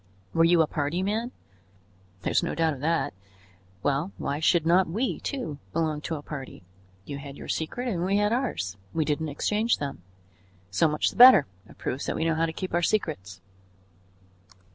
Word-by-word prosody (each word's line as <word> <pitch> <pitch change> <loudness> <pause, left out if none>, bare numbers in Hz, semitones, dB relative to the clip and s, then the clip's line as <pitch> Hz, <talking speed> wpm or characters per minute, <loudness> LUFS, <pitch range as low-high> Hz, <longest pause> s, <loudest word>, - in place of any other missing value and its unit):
Were 165 - +4
you 165 0 +5
a - - +1
party 150 +4 -2
man? 220 +5 -1 0.9
There - - -1
is - - +3
no 170 - -2
doubt 165 -1 +2
of 135 - -9
that. 165 +3 0 0.7
Well, 145 +7 0
why 145 - -2
should 160 0 +3
not 175 +1 +4
we, 225 +9 -1
too, 245 - -4
belong 155 -2 0
to 160 - -3
a 145 - -7
party? 135 -9 -8 0.4
You 140 -1 -6
had 140 0 -9
your - - -9
secret 240 +11 -3
and 180 -8 -1
we 195 +2 +2
had 210 +1 +2
ours; 220 - -2 0.2
we 160 -2 +1
didn't 150 +1 -1
exchange 210 +10 +1
them. 140 -10 -5 0.7
So 95 +11 +3
much 150 0 0
the - - -14
better; 250 - +9 0.2
it - - -16
proves 130 +2 -4
that - - -1
we 160 - -1
know 165 - +2
how 165 +1 +1
to - - -3
keep 185 +3 -6
our 175 - +2
secrets." 100 - -1
165 Hz, 190 wpm, -27 LUFS, 145-190 Hz, 0.9 s, better